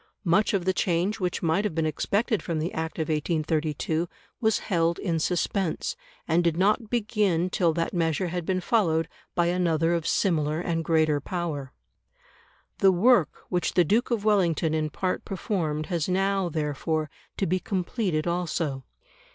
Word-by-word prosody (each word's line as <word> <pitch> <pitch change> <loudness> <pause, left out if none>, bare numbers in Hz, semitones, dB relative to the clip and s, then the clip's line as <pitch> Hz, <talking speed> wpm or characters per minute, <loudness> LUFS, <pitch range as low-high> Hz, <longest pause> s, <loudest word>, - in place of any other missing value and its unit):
Much 190 +5 +3
of 190 -4 0
the 190 - +2
change 185 +4 0
which 180 -2 -2
might 165 +5 +2
have 210 -7 -2
been 165 -1 +1
expected 200 - 0
from 165 -2 -3
the 160 +3 -2
Act 160 0 -4
of 160 - -1
1832 155 +1 -1 0.3
was 220 -2 +2
held 170 -3 0
in 170 -4 -1
suspense, 180 +2 -1 0.3
and 170 +1 +3
did 170 -1 +1
not 210 +4 +2
begin 205 -6 +1
till 170 -2 +2
that 165 +1 -2
measure 170 +1 0
had 175 0 -3
been 185 +2 0
followed 165 -7 +2 0.3
by 175 - +3
another 170 -2 +1
of 170 -2 -1
similar 155 -4 +1
and 170 -2 -1
greater 155 -2 +2
power. 155 -6 -4 1.1
The 195 - +6
work 190 - +3
which 180 -2 -1
the 175 -1 +5
Duke 220 +9 +2
of 225 -4 -1
Wellington 175 -6 +2
in 155 -1 0
part 185 +4 -2
performed 165 -6 -2
has 170 0 0
now, 195 0 +1
therefore, 155 0 -1 0.3
to 195 - 0
be 185 +2 +1
completed 185 -4 -1
also. 165 -5 -2
170 Hz, 160 wpm, -26 LUFS, 160-190 Hz, 1.1 s, The